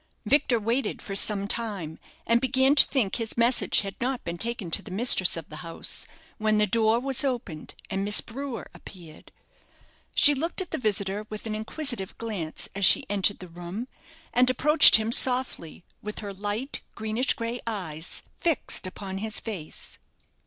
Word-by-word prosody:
Victor 270 Hz, -4 st, +3 dB
waited 230 Hz, +5 st, -1 dB
for 195 Hz, -, -6 dB
some 200 Hz, 0 st, +1 dB
time, 200 Hz, -9 st, -2 dB, 0.3 s
and 235 Hz, 0 st, +3 dB
began 265 Hz, +1 st, +3 dB
to 295 Hz, -, +7 dB
think 235 Hz, -9 st, 0 dB
his 230 Hz, -1 st, -4 dB
message 235 Hz, +2 st, +3 dB
had 195 Hz, -1 st, -6 dB
not 255 Hz, +1 st, -2 dB
been 170 Hz, 0 st, -5 dB
taken 230 Hz, -7 st, -3 dB
to -, -, +2 dB
the -, -, -12 dB
mistress 190 Hz, -3 st, +3 dB
of 165 Hz, -, -7 dB
the 155 Hz, -, -8 dB
house, 165 Hz, -1 st, -2 dB, 0.3 s
when 215 Hz, 0 st, +2 dB
the 210 Hz, -, +4 dB
door 220 Hz, +2 st, +2 dB
was 270 Hz, +2 st, 0 dB
opened, 240 Hz, -, -4 dB
and 195 Hz, -, -2 dB
Miss 205 Hz, +1 st, +4 dB
Brewer 265 Hz, +1 st, -6 dB
appeared. 170 Hz, -5 st, -13 dB, 0.8 s
She 290 Hz, -, +7 dB
looked 325 Hz, +7 st, -2 dB
at 375 Hz, -, -1 dB
the -, -, -2 dB
visitor 205 Hz, -2 st, -2 dB
with 215 Hz, +1 st, -8 dB
an 220 Hz, -, -3 dB
inquisitive 220 Hz, -1 st, -3 dB
glance 200 Hz, -9 st, -4 dB
as 200 Hz, +1 st, -4 dB
she -, -, +5 dB
entered 205 Hz, 0 st, +1 dB
the 185 Hz, -, -10 dB
room, 175 Hz, +7 st, -7 dB, 0.5 s
and 250 Hz, +1 st, +5 dB
approached 300 Hz, +4 st, +7 dB
him 220 Hz, 0 st, +2 dB
softly, 250 Hz, -11 st, +2 dB, 0.2 s
with 210 Hz, 0 st, -7 dB
her 205 Hz, -2 st, -6 dB
light, 205 Hz, +7 st, -3 dB
greenish 220 Hz, +4 st, 0 dB
grey 235 Hz, +1 st, -4 dB
eyes 180 Hz, -7 st, -4 dB, 0.2 s
fixed 325 Hz, -, -1 dB
upon 190 Hz, 0 st, -6 dB
his 215 Hz, +1 st, 0 dB
face. 190 Hz, -9 st, -7 dB
215 Hz, 170 wpm, -26 LUFS, 195-245 Hz, 0.8 s, to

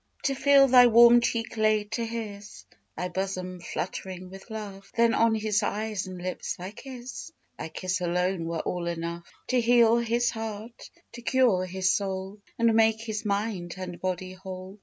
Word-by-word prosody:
To 275 Hz, -, +1 dB
feel 275 Hz, 0 st, +5 dB
thy 250 Hz, -1 st, +8 dB
warm 235 Hz, +1 st, +7 dB
cheek 230 Hz, -1 st, -2 dB
laid 215 Hz, -1 st, +2 dB
to 235 Hz, -, -1 dB
his; 215 Hz, -3 st, -7 dB, 0.3 s
Thy 180 Hz, -, -2 dB
bosom 185 Hz, -1 st, -4 dB
fluttering 185 Hz, +1 st, -5 dB
with 195 Hz, +4 st, -12 dB
love; 205 Hz, -3 st, -8 dB
Then 230 Hz, 0 st, +4 dB
on 230 Hz, -1 st, +3 dB
his 215 Hz, -1 st, 0 dB
eyes 210 Hz, -2 st, -2 dB
and 185 Hz, -1 st, -8 dB
lips 180 Hz, +1 st, -4 dB
thy 185 Hz, +2 st, -7 dB
kiss 255 Hz, +5 st, -9 dB, 0.3 s
Thy -, -, -5 dB
kiss 185 Hz, +2 st, -3 dB
alone 180 Hz, 0 st, 0 dB
were 165 Hz, -1 st, -2 dB
all 175 Hz, -1 st, -3 dB
enough 170 Hz, 0 st, -5 dB, 0.2 s
To 255 Hz, -1 st, +3 dB
heal 235 Hz, -1 st, +5 dB
his 235 Hz, +1 st, +1 dB
heart, 225 Hz, +1 st, -7 dB, 0.2 s
to 240 Hz, -, -10 dB
cure 235 Hz, -7 st, +2 dB
his 190 Hz, +1 st, +1 dB
soul, 195 Hz, 0 st, -3 dB, 0.2 s
And 230 Hz, -1 st, +3 dB
make 220 Hz, 0 st, +3 dB
his 220 Hz, -2 st, -4 dB
mind 200 Hz, -4 st, -2 dB
and 180 Hz, -2 st, -7 dB
body 185 Hz, 0 st, -3 dB
whole. 185 Hz, +1 st, -9 dB
210 Hz, 170 wpm, -27 LUFS, 185-230 Hz, 0.3 s, thy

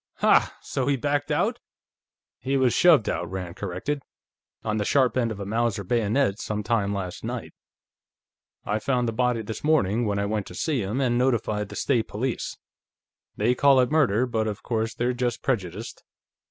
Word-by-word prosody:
"Ha! -, -, +3 dB
So 130 Hz, -1 st, -2 dB
he 140 Hz, -, +3 dB
backed 145 Hz, +3 st, -1 dB
out?" -, -, +1 dB, 0.8 s
"He 135 Hz, +3 st, 0 dB
was 130 Hz, -3 st, +3 dB
shoved 160 Hz, -11 st, +5 dB
out," -, -, -2 dB
Rand 90 Hz, -2 st, -5 dB
corrected. 100 Hz, +10 st, -3 dB, 0.6 s
"On 110 Hz, -1 st, -1 dB
the 105 Hz, -, 0 dB
sharp 130 Hz, +3 st, +2 dB
end 120 Hz, -3 st, +1 dB
of 105 Hz, -, -6 dB
a 100 Hz, -, -4 dB
Mauser 115 Hz, 0 st, 0 dB
bayonet, 110 Hz, +2 st, +1 dB
sometime 105 Hz, -1 st, -1 dB
last 95 Hz, -3 st, -4 dB
night. -, -, -5 dB, 1.1 s
I 105 Hz, -, 0 dB
found 125 Hz, +1 st, 0 dB
the -, -, 0 dB
body 125 Hz, -1 st, +1 dB
this 110 Hz, +1 st, -6 dB
morning, 120 Hz, -7 st, +2 dB
when 100 Hz, -1 st, 0 dB
I 100 Hz, -, 0 dB
went 105 Hz, -1 st, -2 dB
to 90 Hz, -, -10 dB
see 145 Hz, -, 0 dB
him, 105 Hz, +6 st, -2 dB
and 120 Hz, -2 st, +2 dB
notified 110 Hz, -5 st, 0 dB
the -, -, -8 dB
State 120 Hz, -5 st, +1 dB
Police. 120 Hz, +3 st, -3 dB, 0.8 s
They 115 Hz, +4 st, +3 dB
call 135 Hz, +1 st, +5 dB
it 125 Hz, +2 st, +2 dB
murder, 130 Hz, -7 st, +3 dB
but 110 Hz, -3 st, -1 dB
of 105 Hz, -1 st, -4 dB
course, 115 Hz, -1 st, -1 dB
they're 125 Hz, +1 st, 0 dB
just 120 Hz, -1 st, -2 dB
prejudiced. 110 Hz, -, -3 dB
115 Hz, 180 wpm, -25 LUFS, 105-130 Hz, 1.1 s, shoved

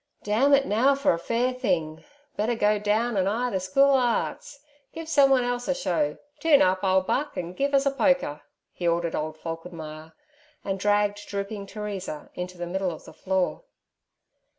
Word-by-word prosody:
'Damn 225 Hz, +8 st, +2 dB
it 280 Hz, -1 st, +5 dB
now 260 Hz, +6 st, +3 dB
for 275 Hz, -7 st, +2 dB
a 165 Hz, -, -3 dB
fair 240 Hz, +7 st, 0 dB
thing; 175 Hz, -, -2 dB, 0.3 s
better 225 Hz, +3 st, 0 dB
go 210 Hz, -1 st, +2 dB
down 215 Hz, +3 st, 0 dB
an' 190 Hz, -1 st, +1 dB
'ire 240 Hz, +5 st, 0 dB
ther 190 Hz, -, 0 dB
School 275 Hz, +10 st, +3 dB
o' 270 Hz, -, +5 dB
Arts. 245 Hz, +3 st, -2 dB, 0.3 s
Give 325 Hz, 0 st, -7 dB
someone 275 Hz, -4 st, +4 dB
else 245 Hz, 0 st, -2 dB
a 275 Hz, -, +1 dB
show. 165 Hz, -, -1 dB, 0.2 s
Toon 310 Hz, -4 st, +5 dB
up, 185 Hz, +1 st, +1 dB
ole 190 Hz, 0 st, +3 dB
buck, 290 Hz, +10 st, -2 dB
an' 175 Hz, 0 st, -4 dB
give 280 Hz, +7 st, 0 dB
us 275 Hz, 0 st, +3 dB
a 275 Hz, -, +3 dB
polka' 270 Hz, -, +1 dB, 0.3 s
he 175 Hz, -, -3 dB
ordered 170 Hz, 0 st, 0 dB
old 155 Hz, +1 st, -3 dB
Falkenmeyer, 160 Hz, -1 st, -8 dB, 0.5 s
and 195 Hz, -1 st, -2 dB
dragged 205 Hz, +1 st, +1 dB
drooping 200 Hz, 0 st, -5 dB
Teresa 195 Hz, -7 st, -6 dB
into 180 Hz, 0 st, -6 dB
the 175 Hz, -, -4 dB
middle 190 Hz, +2 st, -1 dB
of 160 Hz, -, -8 dB
the -, -, -12 dB
floor. 190 Hz, -, -1 dB
205 Hz, 180 wpm, -26 LUFS, 180-255 Hz, 0.5 s, it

